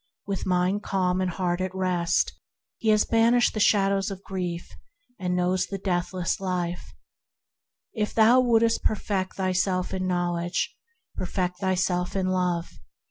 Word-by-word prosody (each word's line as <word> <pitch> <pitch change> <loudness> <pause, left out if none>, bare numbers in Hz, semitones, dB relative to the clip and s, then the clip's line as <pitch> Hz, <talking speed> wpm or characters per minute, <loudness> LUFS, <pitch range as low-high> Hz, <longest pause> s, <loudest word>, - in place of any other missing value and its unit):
With 195 -1 -3
mind 185 +2 +1
calm 185 -2 0
and 185 - 0
heart 180 0 -1
at 185 0 -3
rest, 180 -2 +1 0.5
he 225 - 0
has 215 0 +4
banished 230 +1 +3
the 215 - -3
shadows 195 -1 +3
of 195 -1 -7
grief, 180 -3 -4 0.5
and 180 -1 -1
knows 180 +1 +1
Eternal 185 -2 -2
Life. 180 -2 -3 1.0
If 210 -2 -2
thou 230 +3 +6
wouldst 230 -2 +3
perfect 195 -3 -1
thyself 185 -1 0
in 185 -1 -2
Knowl 175 -1 0
edge, 175 +1 -2 0.4
perfect 180 -1 -2
thyself 185 -2 0
in 190 -1 0
Love. 180 -2 -1
185 Hz, 135 wpm, -26 LUFS, 180-200 Hz, 1.0 s, thou